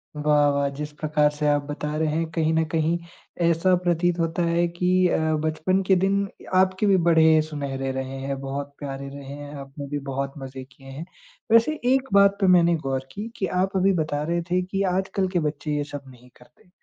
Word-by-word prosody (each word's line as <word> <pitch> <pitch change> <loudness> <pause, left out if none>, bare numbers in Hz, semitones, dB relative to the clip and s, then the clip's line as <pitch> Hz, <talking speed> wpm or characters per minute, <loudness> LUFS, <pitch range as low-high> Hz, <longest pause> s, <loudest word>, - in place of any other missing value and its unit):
वाह, 150 -1 +3
वाह! 140 0 +1
जिस 150 +2 -6
प्रकार 150 -1 +2
से 150 0 -2
आप 145 0 +3
बता 150 +1 -4
रहे 160 0 +1
हैं, 165 0 -1
कहीं 160 0 0
न 160 - +2
कहीं 165 +1 +1 0.5
ऐसा 170 +3 +2
प्रतीत 175 0 +1
होता 165 +1 0
है 170 +1 +2
कि 180 +1 +2
अ, - - +1 0.3
बचपन 170 +5 0
के 190 - +5
दिन 195 +2 +1 0.3
आपके 190 +2 +3
भी 195 - +5
बड़े 160 -1 +5
सुनहरे 140 -3 -4
रहे 130 0 -4
हैं, 135 0 -4
बहुत 140 +1 -5
प्यारे 140 -1 -6
रहे 140 0 -9
हैं, 145 0 -9
आपने 140 0 -8
भी 145 +1 -3
बहुत 135 0 -3
मज़े 135 -1 -8
किए 135 +1 -17
हैं। 135 +5 -7 0.5
वैसे 235 +7 +4
एक 270 0 +1
बात 200 0 +5
पे 195 - +4
मैंने 170 -1 +4
गौर 135 0 -2
की 205 +2 -6
कि 190 - -1 0.2
आप 195 +1 -1
अभी 190 +1 +3
बता 155 -4 -1
रहे 170 +2 -1
थे 180 - +2
कि 195 +2 -3
आजकल 190 0 -1
के 175 - +2
बच्चे 150 -1 -2
ये 145 - 0
सब 145 -1 -8
नहीं 125 -1 -16
करते। 125 +8 -23
155 Hz, 205 wpm, -24 LUFS, 140-180 Hz, 0.5 s, के